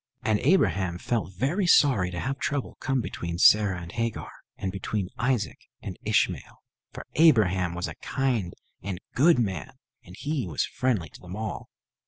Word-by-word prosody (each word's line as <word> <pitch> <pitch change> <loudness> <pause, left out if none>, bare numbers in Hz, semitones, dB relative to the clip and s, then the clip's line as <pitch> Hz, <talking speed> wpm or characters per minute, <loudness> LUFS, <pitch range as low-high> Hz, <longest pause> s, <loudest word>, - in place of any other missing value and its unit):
And 110 -1 +2
Abraham 95 - +2
felt 105 - -2
very 165 - 0
sorry 125 - +5
to 90 -1 -5
have 135 +6 -3
trouble 145 -3 -2
come 135 -2 0
between 85 -6 -5
Sarah 100 -1 +5
and 85 -1 -8
Hagar, 115 -1 -3 0.3
and 95 - -3
between 100 0 -3
Isaac 125 -3 0 0.2
and - - -7
Ishmael; - - -1 0.3
for - - -9
Abraham 95 - +4
was 90 +3 -2
a - - -6
kind 120 -9 -1 0.3
and 95 -2 -4
good 155 +4 +5
man, 95 - -2 0.3
and 90 - -13
he 145 -7 -2
was 80 - -1
friendly 110 -11 -1
to - - -15
them 90 +1 -8
all. 105 - -5
105 Hz, 165 wpm, -26 LUFS, 90-130 Hz, 0.3 s, sorry